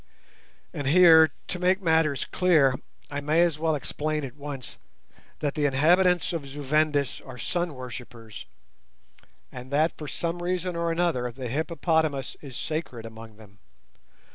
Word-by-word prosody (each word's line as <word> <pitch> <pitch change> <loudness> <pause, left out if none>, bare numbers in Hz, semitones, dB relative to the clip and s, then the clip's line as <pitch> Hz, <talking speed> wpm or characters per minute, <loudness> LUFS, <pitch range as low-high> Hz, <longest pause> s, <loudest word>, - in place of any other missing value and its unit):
And 145 - -4
here, 160 0 +7 0.2
to 180 - -3
make 185 +2 +2
matters 160 -6 +1
clear, 160 -8 +3 0.4
I 145 0 -3
may 155 +4 +3
as 165 -3 0
well 160 -1 +1
explain 150 +1 -3
at 125 -1 -9
once 140 -3 -8 0.6
that 145 -2 0
the 150 -2 +1
inhabitants 175 +6 +3
of 155 -5 -4
Zu 145 +2 -8
Vendis 145 -1 +1
are 130 -2 -10
sun 175 +5 -2
worshippers, 120 -3 -9 1.0
and 125 +1 -9
that 155 +4 +1
for 150 - -6
some 170 +5 -3
reason 180 0 -2
or 170 0 -1
another 165 -8 0
the 125 0 -6
hippopotamus 160 -1 -1
is 135 -4 -9
sacred 155 -8 -4
among 110 -1 -11
them. 100 -2 -17
150 Hz, 145 wpm, -26 LUFS, 130-170 Hz, 1.0 s, here